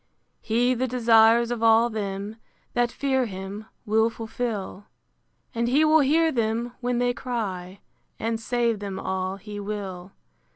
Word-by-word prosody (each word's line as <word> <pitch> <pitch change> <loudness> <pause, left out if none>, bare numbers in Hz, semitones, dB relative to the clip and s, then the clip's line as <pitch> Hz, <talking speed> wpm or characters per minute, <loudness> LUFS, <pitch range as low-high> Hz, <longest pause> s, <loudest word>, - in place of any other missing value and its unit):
He 245 +3 +2
the 255 +1 -1
desires 235 -1 +4
of 240 -2 -3
all 225 +1 +5
them 205 -1 -4 0.4
That 240 -1 +1
fear 265 -3 0
him, 195 +2 -7 0.2
will 220 +2 +3
fulfil; 220 -3 -5 0.7
And 235 0 0
he 285 +6 +4
will 310 +1 +5
hear 320 +3 +3
them 235 0 -1
when 245 0 0
they 245 0 +1
cry, 200 -7 -4 0.4
And 225 0 -2
save 235 -1 0
them 195 -2 -5
all 190 0 -2
he 205 +1 -8
will. 200 -3 -6
225 Hz, 140 wpm, -25 LUFS, 205-245 Hz, 0.7 s, all